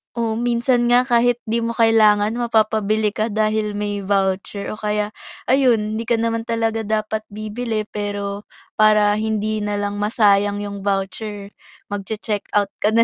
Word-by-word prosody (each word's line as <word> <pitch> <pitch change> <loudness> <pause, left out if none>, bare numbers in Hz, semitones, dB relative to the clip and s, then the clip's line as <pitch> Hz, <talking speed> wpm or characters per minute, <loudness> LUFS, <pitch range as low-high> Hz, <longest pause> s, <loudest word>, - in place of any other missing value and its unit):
O 225 -1 -1
minsan 240 0 +1
nga 245 +1 +5
kahit 245 -1 +2
di 225 +1 -1
mo 230 0 -2
kailangan 215 -2 +4
mapapabili 220 -2 +1
ka 215 +2 -1
dahil 215 -1 0
may 205 0 -2
voucher 195 0 -1
o 215 - -7
kaya, 210 0 -1 0.3
ayun 230 -5 +2
di 230 - -5
ka 235 - +3
naman 230 0 -1
talaga 225 -2 -1
dapat 215 0 -2
bibili 215 +1 -4
pero 205 -1 -5 0.3
para 215 -1 +5
hindi 215 0 -1
nalang 205 -1 -2
masayang 205 -1 +2
yung 200 -1 -6
voucher, 200 +1 -3 0.4
mag-che-checkout 205 0 -2
ka 215 +1 +1
na 230 - +6
215 Hz, 145 wpm, -20 LUFS, 205-225 Hz, 0.4 s, na